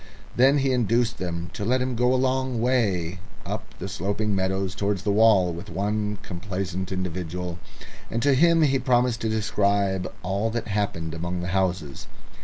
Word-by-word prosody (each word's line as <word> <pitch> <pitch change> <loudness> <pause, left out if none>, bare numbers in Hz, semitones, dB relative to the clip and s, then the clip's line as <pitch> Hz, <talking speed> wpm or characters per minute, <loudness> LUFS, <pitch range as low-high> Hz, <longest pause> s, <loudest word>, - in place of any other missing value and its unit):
Then 135 +4 +5
he 135 -1 +2
induced 120 -1 +1
them 85 -1 -4
to - - -5
let 125 +5 +2
him 125 -1 -1
go 125 +2 +3
a 130 - +3
long 130 -1 0
way 100 -9 +1 0.3
up - - -4
the - - -5
sloping 100 +3 -1
meadows 95 0 -1
towards 100 -1 -1
the 105 - +1
wall 100 -4 +5
with 85 +4 -8
one 105 +3 -1
complacent 95 0 -4
individual, 90 -1 -4 0.5
and 115 - -1
to 140 0 +4
him 165 +4 +5
he 135 -3 +3
promised 125 -2 +2
to 110 - 0
describe 100 -3 +1
all 100 +5 0
that 115 -1 -3
happened 100 -6 -2
among 85 +2 -3
the 90 - -3
houses. 90 -7 -1
100 Hz, 170 wpm, -25 LUFS, 90-120 Hz, 0.5 s, Then